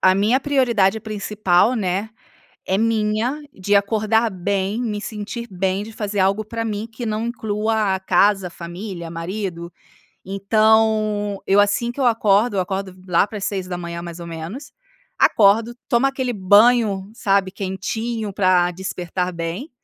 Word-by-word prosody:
a 185 0 +5
minha 215 +6 +3
prioridade 235 -8 +2
principal, 210 -1 +1
né, 200 -1 -1 0.6
é 190 - +1
minha, 225 +5 0
de 205 +2 0
acordar 220 +3 +2
bem, 195 +2 -2
me 210 -4 -3
sentir 215 +3 -6
bem 190 +1 -1
de 220 - -9
fazer 210 -2 -3
algo 195 +3 +2
para 230 +2 -4
mim, 215 -1 -3
que 235 +2 -6
não 220 +1 -2
inclua 215 -3 0
a - - -4
casa, 190 0 +2
família, 175 +1 -7
marido. 170 0 -5 0.5
Então, 215 +1 +2
eu 195 +1 +4
assim 205 +4 +2
que 240 - -11
eu 265 - +2
acordo 220 -1 +3
eu - - +3
acordo 190 0 -4
lá 180 +2 +3
para 215 - -7
as - - -6
6h, 180 -3 -4
mais 170 0 -8
ou 170 - -7
menos. 170 - -7 0.5
Acordo, 220 +3 +4
tomo 240 +3 +3
aquele 260 -2 -2
banho, 205 0 +4
sabe, 195 -3 +1
quentinho, 205 +3 -4
para 185 -2 +3
despertar 180 0 -3
bem. 170 - -5
205 Hz, 150 wpm, -21 LUFS, 190-220 Hz, 0.6 s, a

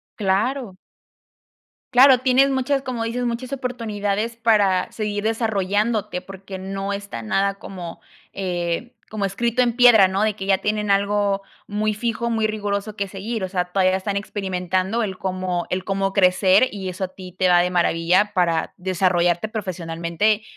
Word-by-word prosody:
Claro. 205 +2 -1 1.2
Claro, 255 0 +7
tienes 260 +2 +3
muchas, 270 +1 0
como 250 -4 -3
dices, 240 +2 -2
muchas 240 +2 -3
oportunidades 230 -4 -2
para 210 -5 +2
seguir 210 -2 -3
desarrollándote, 215 -2 0
porque 190 0 -9
no 195 +1 -4
está 200 - -6
nada 195 - 0
como, 180 -4 -8 0.3
eh, 180 +4 -3 0.2
como 210 -2 -2
escrito 235 +5 +1
en 240 -2 0
piedra, 240 -5 +7
¿no?, 190 +2 -1
de 215 -1 +1
que 195 - -6
ya 195 -1 +2
tienen 210 0 -1
algo 200 0 +1 0.2
muy 210 +1 -1
fijo, 235 +1 -2
muy 225 -1 0
riguroso 205 -1 -2
que 200 -1 -2
seguir, 200 +3 -5
o 185 - -3
sea, 180 -2 -1
todavía 185 0 +3
están 200 +1 -3
experimentando 190 +1 -2
el 195 -4 -3
cómo 185 -2 -2
el 185 0 -1
cómo 195 0 -1
crecer 190 +3 +4
y 190 -2 -5
eso 185 +1 -3
a - - -6
ti 185 0 -11
te 185 +1 +1
va 175 - +6
de 180 +1 0
maravilla 180 +3 +2
para 170 -3 +1
desarrollarte 180 0 +1
profesionalmente, 185 0 -1
200 Hz, 160 wpm, -22 LUFS, 185-220 Hz, 1.2 s, Claro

